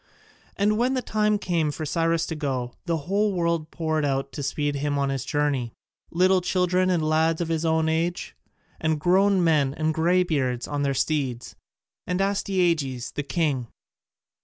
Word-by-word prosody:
And 210 +2 +2
when 255 +2 +2
the 255 - -1
time 210 -1 +1
came 170 -6 0
for 155 +2 -4
Cyrus 165 +1 +1
to 160 - -4
go, 130 -5 -3
the 165 -1 +1
whole 200 +2 +1
world 170 -3 -1
poured 155 -2 -1
out 135 -1 -1
to 145 - -6
speed 145 +1 -1
him 145 0 -1
on 140 -1 0
his 135 -2 -2
journey 140 -5 -1 0.4
little 185 +2 +3
children 180 0 +1
and 165 -4 +1
lads 160 +1 +2
of 170 -2 -2
his 165 0 -1
own 160 0 +2
age, 165 +2 -1 0.4
and 160 -1 0
grown 190 +3 +3
men 150 -4 +2
and 155 0 0
greybeards 160 -7 +1
on 145 -1 -2
their 140 -1 0
steeds, 130 -5 -2 0.5
and 180 0 -1
Astyages 175 -10 0
the - - -3
king. 140 -3 -1
160 Hz, 165 wpm, -25 LUFS, 145-180 Hz, 0.5 s, little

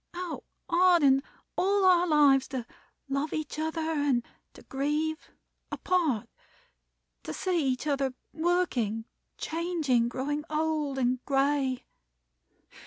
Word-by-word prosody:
How 355 -2 -5 0.2
hard 350 -1 +4
in 270 -1 +5 0.3
all 395 +1 +2
our 360 -1 +5
lives 285 -4 +5
to 255 -3 -4 0.4
love 275 +3 -2
each 310 -1 -4
other; 320 +1 -2
and 290 -6 0 0.3
to - - -14
grieve, 300 +4 -2 0.4
apart, 325 - 0 0.9
to 155 - -6
see 345 -6 0
each 255 +2 -1
other 275 -3 0 0.2
working, 310 - 0 0.3
changing, 315 -8 0
growing 290 +4 -2
old 305 -2 -1
and 255 -1 0
gray. 270 -2 +1
295 Hz, 110 wpm, -28 LUFS, 265-330 Hz, 0.9 s, in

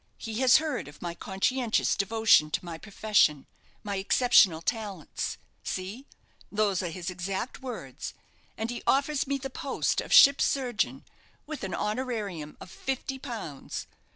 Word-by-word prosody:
He 225 0 -5
has 260 -1 +7
heard 305 - -2
of 145 - -13
my 175 -1 -4
conscientious 220 +7 0
devotion 215 -6 +4
to 180 - -2
my 165 -1 -6
profession 200 -8 +2 0.4
my 200 -1 -3
exceptional 195 -4 +5
talents 200 -3 -3 0.3
see, 200 +9 -5 0.4
those 205 -3 +1
are 180 - -2
his 175 +2 -5
exact 190 +8 -4
words, 260 -2 -6 0.4
and 225 +2 -2
he 240 - -5
offers 280 +1 +2
me 280 0 0
the 270 0 -6
post 270 +1 -1
of - - -9
ship's 280 0 +8
surgeon, 250 -5 -1 0.4
with 305 0 -6
a 190 - -3
honorarium 210 - -3
of 180 - -11
fifty 265 0 -4
pounds. 220 - -6
215 Hz, 145 wpm, -28 LUFS, 185-260 Hz, 0.4 s, ship's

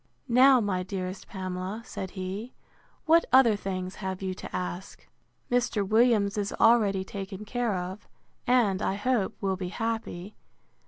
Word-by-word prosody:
Now, 255 +2 +6
my 200 -5 -1
dearest 185 0 -5
Pamela, 185 +3 -5
said 190 -6 -6
he, 195 +6 -5 0.5
what 330 +1 +5
other 250 -4 +6
things 185 -2 -4
have 190 -2 -4
you 190 -1 -3
to - - -8
ask? 180 +1 -6 0.4
Mr. 240 -5 +1
Williams 215 -2 +3
is 200 0 -2
already 210 -5 +4
taken 195 0 -7
care 240 -2 -1
of; 185 +4 -5 0.4
and, 225 -6 +3
I 195 - 0
hope, 210 -1 0
will 190 -2 0
be 180 -1 -4
happy. 220 -3 -4
200 Hz, 145 wpm, -28 LUFS, 190-230 Hz, 0.5 s, Now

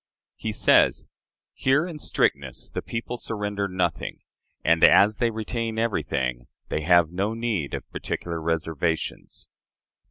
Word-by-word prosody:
He 110 - -4
says: 105 - +4 0.5
"Here, 145 +5 +2
in 170 -4 -7
strictness, 70 - -1
the - - -3
people 115 +1 -4
surrender 105 -3 -3
nothing; 90 -3 -2 0.4
and, 80 0 +3
as 105 +1 +7
they 120 - +2
retain 110 0 -3
everything, 65 - -1 0.2
they 75 - -1
have 85 0 +4
no 100 +5 -1
need 110 -11 -2
of - - -7
particular 85 -1 -4
reservations." 80 0 -2
100 Hz, 125 wpm, -25 LUFS, 80-115 Hz, 0.5 s, as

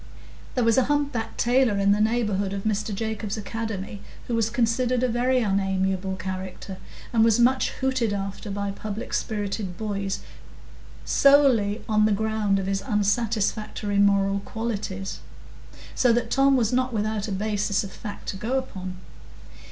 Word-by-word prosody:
There 250 - +2
was 230 +2 +4
a 255 - +2
humpbacked 285 -6 -1
tailor 245 -3 +3
in 200 0 +3
the 205 +1 +3
neighbourhood 210 -3 +1
of 195 -1 -4
Mr 215 0 -1
Jacobs's 220 0 -3
academy, 210 -1 -5 0.2
who 240 - -4
was 225 -1 +2
considered 240 +2 +1
a - - +4
very 250 +2 +1
unamiable 190 -1 0
character, 185 0 -6 0.4
and 225 -1 +5
was 225 0 +4
much 260 +2 +3
hooted 260 -4 -1
after 200 +1 -4
by 200 0 -2
public 215 +3 -6
spirited 205 -4 -2
boys 200 -3 -3 0.8
solely 260 -7 +4
on 215 -1 +3
the 215 - +3
ground 215 -1 +1
of 195 - -2
his 195 0 -1
unsatisfactory 210 -2 0
moral 200 0 +3
qualities; 200 -3 -4 0.7
so 250 - +3
that 240 +1 0
Tom 275 0 +4
was 230 -1 +1
not 255 0 +1
without 215 -1 -1
a - - -4
basis 205 0 0
of 195 - -7
fact 205 +1 -8
to 195 - -4
go 235 +7 -1
upon. 185 -8 -5
215 Hz, 150 wpm, -25 LUFS, 200-235 Hz, 0.8 s, and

